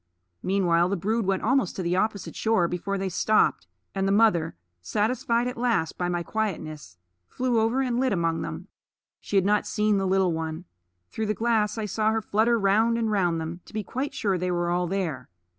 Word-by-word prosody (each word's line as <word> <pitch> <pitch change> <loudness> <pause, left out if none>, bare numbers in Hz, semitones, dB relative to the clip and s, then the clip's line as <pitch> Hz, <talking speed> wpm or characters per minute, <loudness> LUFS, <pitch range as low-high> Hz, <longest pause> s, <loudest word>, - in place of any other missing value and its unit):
Meanwhile 180 -2 +2
the 200 - 0
brood 215 +4 -1
went 195 -1 0
almost 255 -4 +1
to 185 - -3
the 175 +1 0
opposite 205 +1 -1
shore 220 -6 +2
before 190 +3 -3
they 195 0 -2
stopped, 190 - +2 0.3
and 195 0 0
the - - +2
mother, 200 - +3 0.3
satisfied 230 - 0
at 250 - -5
last 235 -10 0
by 175 -1 -2
my 175 -1 -1
quietness, 155 - -4 0.3
flew 250 - 0
over 225 +4 +1
and 245 -2 0
lit 260 -1 +1
among 165 -3 0
them. 160 - -6 0.5
She - - -5
had 190 -1 +4
not 210 +1 +2
seen 210 -1 +1
the 195 - 0
little 190 -2 +2
one. 160 +1 -4 0.5
Through 220 - -3
the 215 - 0
glass 225 -1 +1
I 220 - -2
saw 215 +1 0
her 225 0 0
flutter 225 +3 +2
round 220 +3 +3
and 225 -2 0
round 175 -5 +1
them, 165 +2 -5
to - - -16
be 215 -1 -2
quite 265 +8 -4
sure 195 -8 0
they 180 +1 -1
were 175 -1 0
all 175 0 0
there. 170 -9 -3
200 Hz, 205 wpm, -26 LUFS, 175-220 Hz, 0.5 s, had